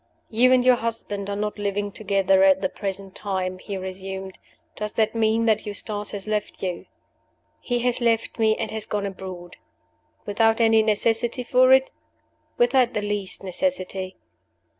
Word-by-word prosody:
"You 245 +3 +4
and 255 -1 +4
your 250 -1 +6
husband 215 -4 -4
are 200 - -2
not 210 +1 -3
living 205 0 -2
together 195 -2 +2
at 190 0 +5
the 190 - 0
present 195 -1 -5
time," 185 -2 -3
he 200 0 -5
resumed. 190 0 -7 0.4
"Does 210 0 -4
that 220 -1 +1
mean 225 0 +2
that 220 -2 +2
Eustace 205 0 -1
has 205 0 -6
left 210 -2 -3
you?" 180 -2 -4 0.7
"He 245 - -2
has 245 0 0
left 230 0 0
me, 220 -1 +3
and - - -3
has 220 -1 -3
gone 205 -1 -2
abroad." 185 -2 -8 0.7
"Without 225 +2 +2
any 225 -1 +5
necessity 225 +3 +1
for 255 +1 +4
it?" 265 0 +5 0.7
"Without 245 0 +3
the 210 - -1
least 205 -3 -3
necessity." 190 -3 -2
210 Hz, 160 wpm, -24 LUFS, 195-230 Hz, 0.7 s, your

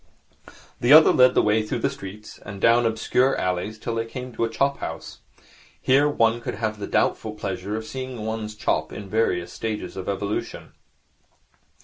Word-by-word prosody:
The 120 - +2
other 155 +1 +8
led 125 0 +5
the - - +4
way 105 +1 +3
through 105 - -3
the - - +3
streets 100 +2 -10
and 100 -1 -9
down 115 +2 +4
obscure 125 +4 +1
alleys 90 +4 -2
till 115 +2 -4
they 115 0 -1
came 125 +1 -7
to 115 - -2
a 115 - +1
chop 140 +5 0
house. - - -7 0.6
Here 140 +3 +3
one 115 -4 +2
could - - -4
have 110 0 -3
the 100 - -4
doubtful 110 -1 0
pleasure 100 0 -4
of 110 0 -4
seeing 130 -3 -6
one's 110 -1 -4
chop 105 - -1
in 105 - -7
its 95 - -13
various 90 -6 0
stages 110 -2 -4
of 95 0 -5
evolution. 100 +1 -4
110 Hz, 185 wpm, -24 LUFS, 105-120 Hz, 0.6 s, other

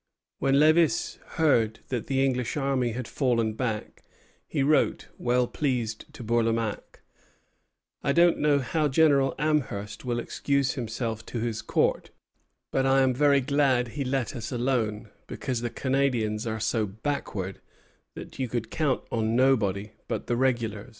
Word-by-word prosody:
When 135 0 +2
Lévis 155 +3 +3 0.2
heard 120 -9 +2
that 125 -4 -3
the 135 0 +2
English 125 0 -1
army 135 -4 0
had 125 0 -5
fallen 115 -5 0
back, 110 -2 -4 0.5
he 140 - 0
wrote, 150 +2 +2
well 125 0 +2
pleased, 120 -5 -2
to - - -8
Bourlamaque: 115 -1 -1 1.0
"I 140 - +2
don't 170 +3 +4
know 150 -1 +3
how 155 +4 0
General 140 -2 +3
Amherst 135 -9 -1
will 120 -2 -1
excuse 140 +2 0
himself 115 -3 -4
to 120 - -4
his 110 -1 -2
Court, - - 0 0.6
but 135 0 +1
I 135 0 +4
am 130 -1 +3
very 140 +1 +4
glad 130 -3 +2
he 140 +4 -3
let 135 0 -2
us 110 -3 -5
alone, 115 -4 -1 0.2
because 125 -4 -3
the 120 - -2
Canadians 120 -5 0
are 110 0 -2
so 110 0 0
backward 100 -4 -4 0.5
that - - -10
you 130 - 0
could 115 -1 -4
count 150 -5 0
on 110 0 0
nobody 110 -6 +2 0.2
but - - -3
the 120 - 0
regulars." 120 -3 -1
125 Hz, 150 wpm, -27 LUFS, 115-140 Hz, 1.0 s, don't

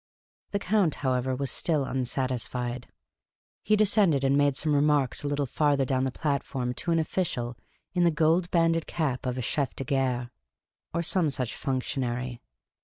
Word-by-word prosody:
The 200 - -1
Count, 200 -5 +1
however, 130 0 +1
was 135 0 -1
still 155 -5 +1
unsatisfied. 125 -1 -2 0.7
He 215 - +3
descended, 200 -9 +4
and 135 0 +3
made 145 -1 +3
some 155 -1 0
remarks 145 -3 +2
a 145 - -3
little 145 0 0
farther 140 +1 +1
down 130 0 0
the 130 - -1
platform 135 -3 -2
to 150 - -4
an 165 - +3
official 155 -7 -1 0.4
in 180 -1 +2
the 170 - +5
gold 165 +3 +2
banded 165 -1 +2
cap 135 -6 -2
of 125 0 -2
a - - -1
chcf 135 +2 -1
de - - -1
gare, 130 -4 -1 0.6
or 170 +1 -1
some 170 -1 +2
such 130 -4 -2
functionary. 125 -2 -3
140 Hz, 165 wpm, -27 LUFS, 130-160 Hz, 0.7 s, the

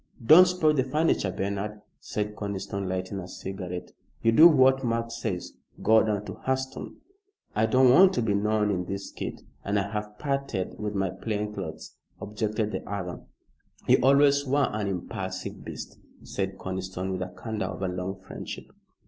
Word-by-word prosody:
"Don't 175 +8 +9
spoil 175 -4 +3
the 135 -3 +2
furniture, 150 -6 +1
Bernard," 100 +2 -3 0.2
said 105 0 -3
Conniston, 100 -2 -4
lighting 95 +1 -3
a 90 - -7
cigarette. 90 -1 -6 0.3
"You 115 - +5
do 155 +9 +9
what 135 -4 +5
Mark 115 -1 -1
says. 110 -6 -4 0.3
Go 110 0 +5
down 105 -1 -1
to - - -6
Hurseton." 130 0 -2 0.6
"I 110 +1 +3
don't 130 +2 +5
want 185 +8 +8
to 120 - 0
be 105 -2 +1
known 105 +1 +1
in 90 -2 -1
this 100 +2 -5
kit, - - -6 0.2
and 100 +1 0
I 100 0 -1
have 105 0 -4
parted 140 -9 -2
with 105 -1 -3
my 95 -2 0
plain 105 -1 -3
clothes," 80 -6 -7 0.2
objected 105 +1 -2
the - - -4
other. 90 -3 -4 0.7
"You - - +6
always 140 +2 +5
were 140 +1 +1
an 105 -1 -1
impulsive 95 0 -5
beast," - - -8 0.2
said 95 -1 -3
Conniston, 95 0 -4
with 95 - -2
the 90 - -2
candour 105 -1 -3
of - - -5
a - - +1
long 90 +1 -4
friendship. - - -8
105 Hz, 170 wpm, -27 LUFS, 95-125 Hz, 0.7 s, Don't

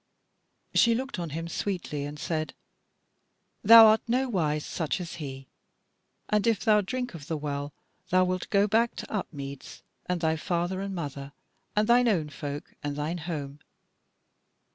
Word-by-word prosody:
She 235 -1 +5
looked 260 -4 -4
on 170 -2 -3
him 165 +3 -4
sweetly 170 -5 -3
and 145 +1 -7
said: 155 0 -3 1.1
"Thou 225 +1 +10
art 220 0 +5
nowise 195 - 0
such 160 +2 -2
as 170 -2 -6
he; 135 -4 -7 0.8
and 210 +1 +1
if 225 -2 +1
thou 210 -2 +5
drink 250 +4 -4
of 150 -4 -9
the 160 - -2
Well, 145 -1 -4 0.4
thou 185 0 +4
wilt 185 0 -2
go 200 0 +4
back 230 +3 +2
to - - -8
Upmeads, 140 -9 -6 0.2
and 180 -1 0
thy 160 -1 +1
father 175 +3 -1
and 195 -1 -4
mother, 140 -4 -6 0.4
and 210 +1 +2
thine 245 +1 +5
own 170 -9 +1
folk 145 0 -6
and 145 -1 -3
thine 155 +4 -3
home. 150 -4 -5
170 Hz, 155 wpm, -28 LUFS, 150-210 Hz, 1.1 s, Thou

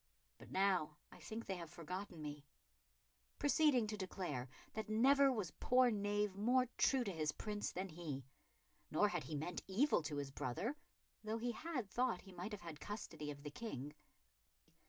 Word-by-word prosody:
But - - -12
now 185 -6 +2
I - - -12
think 230 +1 -5
they 190 - -2
have 170 -2 -6
forgotten 175 0 -5
me," 145 -1 -5 0.9
proceeding 290 -5 +5
to 215 0 -2
declare 180 -10 -3 0.2
that 220 -1 -3
never 270 +5 +6
was 210 - -1
poor 250 -1 +5
knave 205 -1 +1
more 245 +5 +4
true 265 -2 +5
to 200 - -2
his 155 -3 0
Prince 210 +3 -3
than 190 +2 -3
he; 155 -6 -5 0.6
nor 205 +7 +4
had 175 -4 -2
he 155 - -3
meant 165 +5 -2
evil 215 - +4
to 150 -1 -3
his 140 -1 -2
brother, 195 - -2 0.5
though 215 +1 -1
he 240 +1 0
had 260 -2 -3
thought 245 -1 +1
he 195 - -13
might 180 +5 -5
have 210 - -5
had 165 -3 -7
the - - -10
custody 165 -8 -4
of 140 -1 -6
the 145 - -5
King. 150 - -5
195 Hz, 175 wpm, -40 LUFS, 155-225 Hz, 0.9 s, never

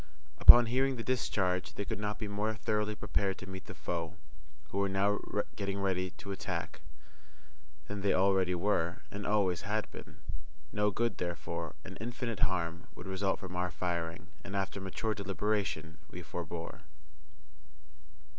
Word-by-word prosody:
Upon 120 0 +11
hearing 130 +3 +2
the 115 - -4
discharge 95 -8 +1
they 100 - -3
could - - -3
not 105 0 -1
be 105 - -3
more 105 +2 -1
thoroughly 105 0 0
prepared 100 -2 0
to - - -8
meet 95 -1 -7
the - - -7
foe, 85 -2 -3 0.6
who 100 - 0
were 100 0 +2
now 100 +1 +2 0.4
getting 100 -1 -2
ready 95 -1 +1
to 100 - -6
attack, 80 -5 -3 1.1
than 100 0 -4
they 100 - +3
already 95 -1 +4
were, 85 -2 +1
and 100 0 -4
always 100 -4 +2
had 105 +1 -1
been. - - -10 0.6
No 105 0 +3
good, 120 +4 0
therefore, 85 -2 -3
and - - -8
infinite 115 -1 -3
harm, 85 -2 0
would - - -9
result 95 0 0
from 95 -3 -6
our 90 0 +1
firing, 85 0 -2 0.2
and 95 - -6
after 95 0 -1
mature 100 +3 -1
deliberation, 100 -4 -1
we 90 - -7
forbore. 85 +1 -5
95 Hz, 155 wpm, -33 LUFS, 90-105 Hz, 1.1 s, Upon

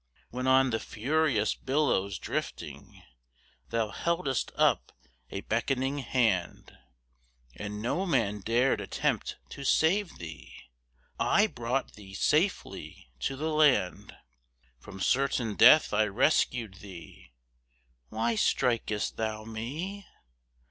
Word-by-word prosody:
When 125 +2 -3
on 130 0 +4
the 115 - 0
furious 130 -2 0
billows 130 -9 0
drifting - - -6 0.7
Thou 115 -2 0
heldest 160 - -1
up - - +2 0.4
a 95 - -5
beckoning 130 +5 -1
hand, 115 -8 -1 0.8
And 105 0 -6
no 180 +11 -1
man 110 - +1
dared 120 +6 +1
attempt - - -2
to 140 - -8
save 170 +8 +2
thee, 70 -7 -10 0.6
I 205 - +4
brought 125 - -3
thee 95 -2 -12
safely 155 - -1
to 135 - -2
the 155 +3 -2
land. 145 -12 +2 0.6
From 95 - -11
certain 125 -1 +1
death 135 +3 +7
I 110 +1 +3
rescued 110 -1 +1
thee: 85 -10 -12 0.8
Why 115 +2 0
strik'st 110 -1 0
thou 110 -1 -3
me? 150 - -6
120 Hz, 105 wpm, -29 LUFS, 105-140 Hz, 0.8 s, death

